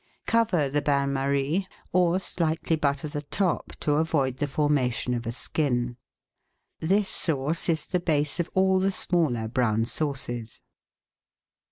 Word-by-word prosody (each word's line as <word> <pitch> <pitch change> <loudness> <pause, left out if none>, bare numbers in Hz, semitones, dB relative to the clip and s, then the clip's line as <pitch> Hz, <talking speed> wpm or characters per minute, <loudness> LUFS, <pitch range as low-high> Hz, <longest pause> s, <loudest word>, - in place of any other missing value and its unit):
Cover 215 -10 +2
the 145 +2 0
bain 140 -1 +1
marie, 140 +7 0 0.3
or 180 0 +4
slightly 165 -3 0
butter 145 -1 0
the 145 0 -4
top 180 +5 -1
to 145 -1 +2
avoid 145 -5 +1
the 145 - -1
formation 140 -4 +1
of 120 -1 -3
a - - -1
skin. 125 -2 -1 0.8
This 195 +5 +2
sauce 160 -1 -1
is 160 -2 +1
the 180 - 0
base 150 -2 0
of 170 - -1
all 190 0 +4
the 190 +1 +2
smaller 155 -12 0
brown 115 -2 +1
sauces. 120 -5 -3
145 Hz, 140 wpm, -26 LUFS, 135-170 Hz, 0.8 s, or